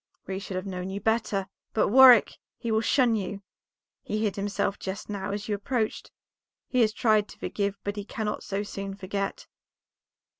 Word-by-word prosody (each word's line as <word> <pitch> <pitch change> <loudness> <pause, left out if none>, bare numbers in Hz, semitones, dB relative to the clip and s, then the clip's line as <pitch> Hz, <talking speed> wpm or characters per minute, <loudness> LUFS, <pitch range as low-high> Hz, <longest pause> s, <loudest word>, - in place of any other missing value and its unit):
"We 190 0 -3
should 195 -1 -6
have 185 +1 -3
known 185 -1 -4
you 195 +1 -4
better. 215 -3 0 0.3
But, 220 - +3
Warwick, 250 -1 +7 0.2
he 230 - -3
will 220 0 +3
shun 240 -1 +3
you; 200 -1 -4 0.6
he 215 +1 -2
hid 205 -4 0
himself 200 0 -1
just 195 +2 -5
now 195 -2 -3
as 205 0 -4
you 215 - 0
approached; 220 +2 -2 0.6
he 255 - +2
has 220 -2 +4
tried 215 -1 +2
to - - -13
forgive, 200 -1 -2
but 205 +1 -3
he 205 - -3
cannot 215 0 -3
so 200 0 -3
soon 195 -1 -6
forget." 195 0 -4
205 Hz, 180 wpm, -27 LUFS, 195-220 Hz, 0.6 s, Warwick